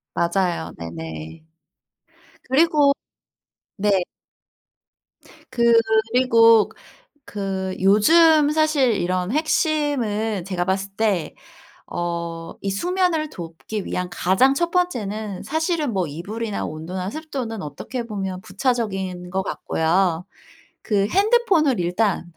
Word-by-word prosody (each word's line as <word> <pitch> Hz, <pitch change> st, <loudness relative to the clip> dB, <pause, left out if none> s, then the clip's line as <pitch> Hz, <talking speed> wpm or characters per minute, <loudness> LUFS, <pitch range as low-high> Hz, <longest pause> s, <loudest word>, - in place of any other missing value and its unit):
맞아요. 170 Hz, -, 0 dB
네네. 80 Hz, -, -8 dB, 1.0 s
그리고 290 Hz, +1 st, +4 dB, 0.8 s
네. 200 Hz, -2 st, +2 dB, 1.5 s
그리고 230 Hz, -1 st, +4 dB
그 -, -, -19 dB, 0.5 s
그 190 Hz, -2 st, -3 dB
요즘 300 Hz, -, +5 dB
사실 305 Hz, -5 st, +2 dB
이런 185 Hz, +1 st, -1 dB
핵심은 285 Hz, -, 0 dB
제가 185 Hz, -2 st, -2 dB
봤을 195 Hz, +1 st, -1 dB
때 205 Hz, -7 st, 0 dB, 0.5 s
어 170 Hz, -1 st, -4 dB
이 195 Hz, -, -2 dB
수면을 340 Hz, -, 0 dB
돕기 175 Hz, +5 st, -6 dB
위한 180 Hz, 0 st, -3 dB
가장 190 Hz, +11 st, +3 dB
1 340 Hz, +4 st, 0 dB
번째는 215 Hz, -, -2 dB
사실은 315 Hz, -3 st, -1 dB
뭐 190 Hz, -3 st, 0 dB
이불이나 205 Hz, +8 st, -4 dB
온도나 180 Hz, +5 st, -5 dB
습도는 265 Hz, -7 st, -5 dB
어떻게 155 Hz, -, -5 dB
보면 195 Hz, -4 st, -4 dB
부차적인 190 Hz, -5 st, -2 dB
것 190 Hz, +1 st, -1 dB
같고요. 175 Hz, 0 st, 0 dB, 0.6 s
그 200 Hz, -2 st, +1 dB
핸드폰을 390 Hz, -, +3 dB
일단 175 Hz, 0 st, 0 dB
210 Hz, 205 characters per minute, -22 LUFS, 180-270 Hz, 1.5 s, 요즘